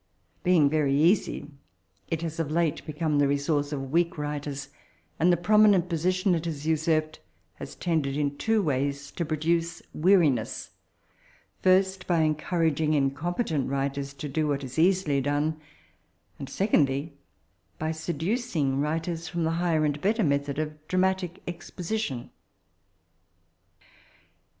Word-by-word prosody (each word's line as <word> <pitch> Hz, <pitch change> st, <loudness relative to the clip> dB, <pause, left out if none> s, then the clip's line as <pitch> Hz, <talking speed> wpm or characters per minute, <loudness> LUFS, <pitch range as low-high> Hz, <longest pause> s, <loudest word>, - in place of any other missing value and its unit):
Being 175 Hz, -5 st, +4 dB
very 140 Hz, -2 st, +2 dB
easy, 170 Hz, -2 st, +2 dB, 0.6 s
it 165 Hz, 0 st, -2 dB
has 165 Hz, -1 st, -4 dB
of 160 Hz, -3 st, -1 dB
late 165 Hz, -1 st, 0 dB
become 155 Hz, -1 st, 0 dB
the 145 Hz, -, +4 dB
resonroe 145 Hz, +1 st, 0 dB
of 135 Hz, -2 st, -4 dB
weak 170 Hz, +1 st, +1 dB
writers; 145 Hz, -2 st, -4 dB, 0.5 s
and 175 Hz, +3 st, +4 dB
the 175 Hz, -, +3 dB
prominent 200 Hz, -1 st, +4 dB
position 185 Hz, +3 st, +1 dB
it 165 Hz, -1 st, -1 dB
has 155 Hz, -3 st, -4 dB
nsarped 155 Hz, 0 st, +1 dB, 0.4 s
lias -, -, -8 dB
tended 150 Hz, -5 st, -1 dB
in 145 Hz, -1 st, 0 dB
two 220 Hz, +5 st, +1 dB
ways 140 Hz, -1 st, -1 dB
to 170 Hz, -, -3 dB
prodace 165 Hz, +2 st, -1 dB
weariness 155 Hz, -, +2 dB, 0.4 s
— -, -, -33 dB
^first, 190 Hz, 0 st, +3 dB
by 170 Hz, -3 st, +3 dB
enconraging 155 Hz, -1 st, +1 dB
in 135 Hz, -2 st, +2 dB
competent 160 Hz, -, -2 dB
writers 140 Hz, 0 st, -2 dB
to 145 Hz, +2 st, -5 dB
do 155 Hz, +2 st, -1 dB
what 140 Hz, -1 st, -1 dB
is 130 Hz, +3 st, -5 dB
easily 170 Hz, -5 st, +3 dB
done; 145 Hz, +3 st, -1 dB, 0.8 s
and, 135 Hz, -, -6 dB
eecondly, 150 Hz, -6 st, +1 dB, 0.7 s
by 155 Hz, +1 st, -2 dB
seduc 175 Hz, -, -3 dB
ing 135 Hz, -3 st, +1 dB
writers 165 Hz, +3 st, -2 dB
from 170 Hz, +2 st, -2 dB
the 160 Hz, -, +1 dB
higher 165 Hz, -2 st, +1 dB
and 145 Hz, 0 st, -1 dB
bet 210 Hz, +4 st, +2 dB
ter 225 Hz, -, +1 dB
method 140 Hz, -2 st, 0 dB
of 155 Hz, 0 st, -2 dB
dramatic 185 Hz, -1 st, 0 dB
exposition. 175 Hz, -, -4 dB
155 Hz, 140 wpm, -27 LUFS, 145-175 Hz, 0.8 s, Being